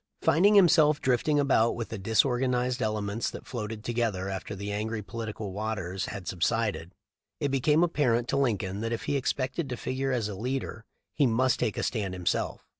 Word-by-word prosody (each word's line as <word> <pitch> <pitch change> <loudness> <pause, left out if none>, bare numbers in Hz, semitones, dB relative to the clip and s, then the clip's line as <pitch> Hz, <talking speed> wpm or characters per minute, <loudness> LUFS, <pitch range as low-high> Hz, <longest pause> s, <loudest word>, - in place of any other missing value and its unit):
Finding 175 +7 +5
himself 155 -6 +6
drifting 130 +4 +2
about 130 -5 +3
with 115 - -5
the 110 - -5
disorgan 125 +5 +2
ized 125 0 -1
elements 105 0 -1
that - - -9
floated 110 -2 -5
together 115 -6 -1
after 95 +1 -5
the 100 +1 -5
angry 110 +1 -3
politicial 110 -2 -5
waters 100 -3 -3
had 95 -4 -7
subsided, 95 -1 -1 0.4
it 145 - 0
became 150 +4 +3
apparent 125 -8 +1
to 140 - +1
Lincoln 105 -7 0
that 115 0 -2
if 115 - -3
he 145 - -1
expected 135 +2 -1
to 125 - -3
figure 135 +1 -2
as 120 -5 0
a 105 - -5
leader 120 +1 -4 0.3
he 145 -3 +3
must 125 +2 +2
take 105 - -1
a - - -1
stand 100 -6 -2
himself. 90 -1 -2
115 Hz, 185 wpm, -28 LUFS, 105-130 Hz, 0.4 s, himself